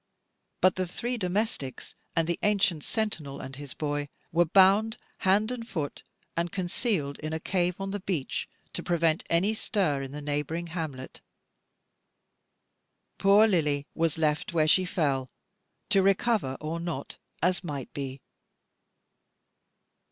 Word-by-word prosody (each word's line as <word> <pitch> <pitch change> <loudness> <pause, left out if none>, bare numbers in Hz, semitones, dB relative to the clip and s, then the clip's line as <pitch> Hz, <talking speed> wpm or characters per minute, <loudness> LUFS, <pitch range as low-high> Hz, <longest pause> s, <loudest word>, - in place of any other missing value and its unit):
But 185 0 +5
the 185 -1 0
three 240 +8 -3
domestics, 185 - -2 0.2
and 165 -1 +2
the 170 - -1
ancient 195 -7 +2
sentinel 170 -11 -2
and 135 - -7
his 140 -1 -9
boy, 145 -1 -2 0.2
were 175 +1 +4
bound 200 +6 +5 0.2
hand 205 +4 +3
and 235 -2 -5
foot, 155 -7 -3 0.3
and 170 0 0
concealed 175 - -1
in 155 +1 -4
a 160 - -1
cave 180 +1 0
on 195 0 -3
the 205 - -2
beach, 180 -8 -2 0.2
to - - -3
prevent 165 -2 +2
any 185 +6 +3
stir 185 -10 0
in 135 -1 -6
the 145 - -5
neighbouring 150 +3 -2
hamlet. 145 -7 -5 2.0
Poor 200 +3 +7
Lily 150 -7 +1
was 165 -1 +1
left 160 +4 0
where 155 -2 +3
she 185 +4 +5
fell, 140 -7 0 0.6
to 195 - +5
recover 195 - +2
or 160 +2 -3
not, 170 -5 -5 0.3
as 180 +2 +2
might 145 -6 -5
be. 135 -1 -5
170 Hz, 135 wpm, -28 LUFS, 145-195 Hz, 2.0 s, Poor